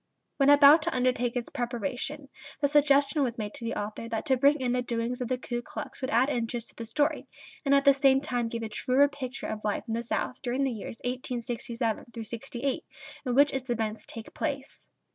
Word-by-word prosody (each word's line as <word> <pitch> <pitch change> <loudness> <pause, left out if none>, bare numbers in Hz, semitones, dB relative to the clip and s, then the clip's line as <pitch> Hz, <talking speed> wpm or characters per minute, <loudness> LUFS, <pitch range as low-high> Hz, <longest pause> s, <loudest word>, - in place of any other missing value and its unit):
When 275 0 +4
about 290 +2 +8
to 330 -2 -2
undertake 250 -1 +1
its 245 -1 -3
preparation 250 +4 -3 0.3
the 285 - +3
suggestion 285 0 +4
was 245 -3 0
made 210 -2 -4
to - - -10
the 230 - -2
author 215 +2 -4
that 225 -1 -3
to 265 - +3
bring 285 +3 +4
in 250 -2 0
the 250 0 +1
doings 240 +1 -2
of 250 - -1
the 255 +1 0
Ku 240 -1 -4
Klux - - -8
would 260 - -2
add 245 +4 +4
interest 235 -3 -2
to - - -22
the 230 - -6
story, 290 +7 0 0.4
and 280 0 +5
at 275 +1 +3
the 280 - +8
same 270 -1 +4
time 245 -4 -1
give 230 0 -4
a 220 - -4
truer 260 +6 +3
picture 275 -2 -6
of 215 -1 -4
life 210 -1 -1
in 225 - -2
the 230 - 0
South 240 +2 -3
during 255 +2 -1
the 270 - +1
years 225 0 -6
1867 240 -2 -3 0.2
68 240 +4 -4 0.4
in 245 - 0
which 285 +1 +5
its 265 -1 -4
events 220 -2 -2
take 225 -1 -9
place. 275 -1 -4
250 Hz, 215 wpm, -28 LUFS, 235-275 Hz, 0.4 s, about